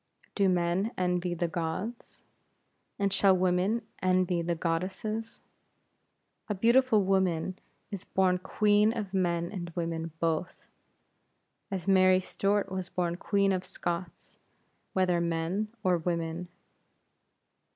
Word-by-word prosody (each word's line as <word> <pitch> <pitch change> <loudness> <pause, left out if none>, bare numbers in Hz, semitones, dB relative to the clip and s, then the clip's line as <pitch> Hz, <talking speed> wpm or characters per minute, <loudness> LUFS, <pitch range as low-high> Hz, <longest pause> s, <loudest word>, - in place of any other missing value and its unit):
Do 200 -2 +3
men 180 +4 +1
envy 180 -1 0
the 175 0 0
gods? 175 +8 -5 0.7
And 200 -1 0
shall 195 -1 +4
women 185 +5 +1 0.2
envy 185 -1 +2
the 170 0 -1
goddesses? 185 +7 -3 1.1
A 210 - 0
beautiful 230 +1 +4
woman 185 -2 +1 0.3
is 200 -3 -5
born 185 -1 +1
Queen 210 +3 +3
of 200 -3 -4
men 170 -2 0
and 175 -4 -5
women 165 -1 -3
both, 165 +1 -2 1.0
as 190 -1 -4
Mary 185 -1 +5
Stuart 195 +1 0
was 185 -1 -4
born 175 -2 -1
Queen 200 +1 +2
of 185 -1 -1
Scots, 175 -1 -5 0.5
whether 180 -2 +2
men 170 +5 -1 0.2
or 180 -3 +3
women. 170 +1 -2
185 Hz, 115 wpm, -29 LUFS, 170-195 Hz, 1.1 s, Mary